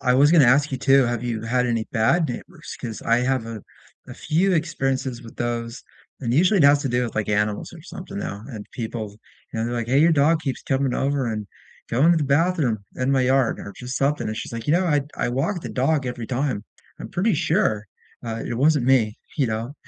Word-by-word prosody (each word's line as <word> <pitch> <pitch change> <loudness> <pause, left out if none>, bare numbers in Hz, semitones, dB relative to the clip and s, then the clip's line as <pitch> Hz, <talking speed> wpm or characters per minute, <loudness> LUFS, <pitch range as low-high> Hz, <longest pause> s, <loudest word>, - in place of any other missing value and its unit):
I 125 -1 +2
was 145 +3 +5
gonna 160 -5 +7
ask 140 +3 +3
you 130 - -2
too, 135 +1 +5
have 120 -1 -2
you 115 -2 -3
had 125 +2 +1
any 115 -2 0
bad 155 +9 +2
neighbors? 155 +5 -8
'Cause 115 -4 -6
I 115 - +3
have 125 -2 0
a 115 -3 -7 0.4
a - - -9
few 185 +5 +1
experiences 135 -6 -1
with 115 - -13
those, 120 0 -3 0.4
and 120 -3 -1
usually 180 - +4
it 155 - +5
has 140 0 +6
to 140 - -1
do 125 0 +1
with, 115 - -5
like, 110 -1 -1
animals 105 0 -1
or 165 - -12
something 190 +3 -8
now, 110 - -5
and 110 -6 -7
people, 110 -2 -5 0.4
you 115 - -4
know, 115 - 0
they're, 120 - -3
like, 120 -1 -2
"Hey, 135 +3 +3
your 165 +2 +5
dog 155 +2 +3
keeps 135 -5 -4
coming 135 -2 0
over 140 -1 0
and 110 -2 -3 0.4
going 145 +9 +4
to - - +2
the 155 - +1
bathroom 140 -4 +2 0.2
in 130 +1 0
my 135 - +3
yard" 130 -1 +2
or - - -7
just 125 +1 -5
something, 140 +2 0
and 110 - -3
she's, - - -5
like, 115 -1 -6
"You 150 - +2
know, 180 +2 +3
I'd 145 -3 0
I - - -1
walk 140 +10 -1
the - - -6
dog 135 +1 0
every 120 -2 -4
time. 125 -4 -2 0.3
I'm - - -8
pretty 200 +3 +1
sure, 150 - +1 0.4
uh, 115 -1 -4
it - - -3
wasn't 140 +1 +3
me," 115 -5 +3 0.2
you 140 - +2
know, 115 +4 -3
130 Hz, 230 wpm, -23 LUFS, 115-150 Hz, 0.4 s, gonna